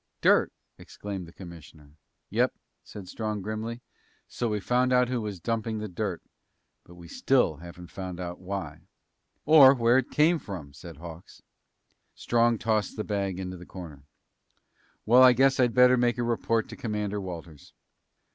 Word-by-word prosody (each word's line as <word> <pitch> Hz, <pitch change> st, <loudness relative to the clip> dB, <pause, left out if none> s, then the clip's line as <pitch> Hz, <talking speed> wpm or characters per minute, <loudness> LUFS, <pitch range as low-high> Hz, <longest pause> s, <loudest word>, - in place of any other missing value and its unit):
"Dirt!" -, -, +3 dB, 0.3 s
exclaimed 100 Hz, -4 st, -7 dB
the -, -, -13 dB
commissioner. 80 Hz, -5 st, -13 dB, 0.4 s
"Yep," -, -, +1 dB, 0.3 s
said 100 Hz, -3 st, -11 dB
Strong 105 Hz, 0 st, -4 dB
grimly. 110 Hz, +3 st, -5 dB, 0.5 s
"So 120 Hz, -, -3 dB
we 105 Hz, -1 st, -1 dB
found 125 Hz, +5 st, +1 dB
out 125 Hz, -1 st, +3 dB
who 125 Hz, -2 st, -1 dB
was 105 Hz, -4 st, -5 dB
dumping 115 Hz, +2 st, -2 dB
the 105 Hz, 0 st, -4 dB
dirt. 95 Hz, -2 st, -4 dB, 0.6 s
But 90 Hz, -, -16 dB
we 85 Hz, -1 st, -13 dB
still 125 Hz, -, +1 dB
haven't 85 Hz, +2 st, -12 dB
found 95 Hz, -2 st, -7 dB
out 90 Hz, -1 st, -6 dB
why." 95 Hz, +1 st, -6 dB, 0.6 s
"Or 145 Hz, -3 st, +8 dB
where 120 Hz, +1 st, +3 dB
it 130 Hz, -, -4 dB
came 160 Hz, +2 st, +3 dB
from," 85 Hz, -, -8 dB
said 80 Hz, +2 st, -11 dB
Hawks. 85 Hz, +1 st, -12 dB, 0.7 s
Strong 120 Hz, 0 st, +1 dB
tossed 110 Hz, -1 st, -1 dB
the 110 Hz, -, -2 dB
bag 100 Hz, -3 st, -2 dB
into 90 Hz, -1 st, -6 dB
the 90 Hz, -, -11 dB
corner. 80 Hz, -7 st, -10 dB, 1.0 s
"Well, 120 Hz, +4 st, +6 dB
I 130 Hz, -1 st, +8 dB
guess 135 Hz, +2 st, +3 dB
I'd 120 Hz, -2 st, +2 dB
better 125 Hz, 0 st, +6 dB
make 120 Hz, 0 st, +1 dB
a 120 Hz, -, -1 dB
report 115 Hz, -1 st, 0 dB
to -, -, -8 dB
Commander 105 Hz, -5 st, -3 dB
Walters." 85 Hz, -5 st, -10 dB
105 Hz, 160 wpm, -27 LUFS, 90-120 Hz, 1.0 s, Or